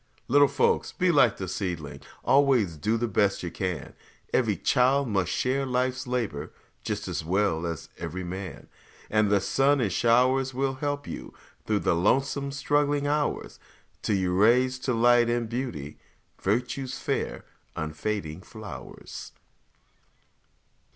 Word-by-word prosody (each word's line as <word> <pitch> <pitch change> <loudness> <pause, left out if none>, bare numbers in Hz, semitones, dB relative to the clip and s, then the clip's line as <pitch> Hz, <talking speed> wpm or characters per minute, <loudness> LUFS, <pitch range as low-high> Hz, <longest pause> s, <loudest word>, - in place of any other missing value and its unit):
Little 145 +2 +6
folks, 140 -1 +1
be 180 -1 +2
like 130 -8 +4
the 95 - -4
seedling, 85 -5 -4 0.2
Always 130 - +3
do 110 +10 0
the 120 +1 -1
best 100 -2 +1
you 85 - -4
can; 90 -3 -4 0.4
Every - - +2
child 135 +2 +3
must 95 -5 0
share 135 +2 0
life's 130 0 -1
labor 115 -13 -2 0.3
Just - - -3
as - - -3
well 85 -1 +1
as 85 -3 -5
every 85 +2 -4
man. 90 -4 -6 0.4
And 105 -1 +3
the 100 0 +4
sun 135 +9 +2
and 105 -7 0
showers 130 +4 +3
will 135 0 0
help 145 +1 -3
you - - -8 0.3
Through 105 -2 +1
the - - +2
lonesome, 135 +10 +1
struggling 145 0 +1
hours, 145 0 -1 0.4
Till 105 - +1
you 90 -2 0
raise 125 +6 +4
to 130 0 -1
light 120 0 +5
and 120 -1 0
beauty 110 - -5 0.4
Virtue's 125 +5 -1
fair, - - -3 0.3
unfading 80 +2 -3
flowers. 110 +1 -9
115 Hz, 135 wpm, -27 LUFS, 95-135 Hz, 0.4 s, Little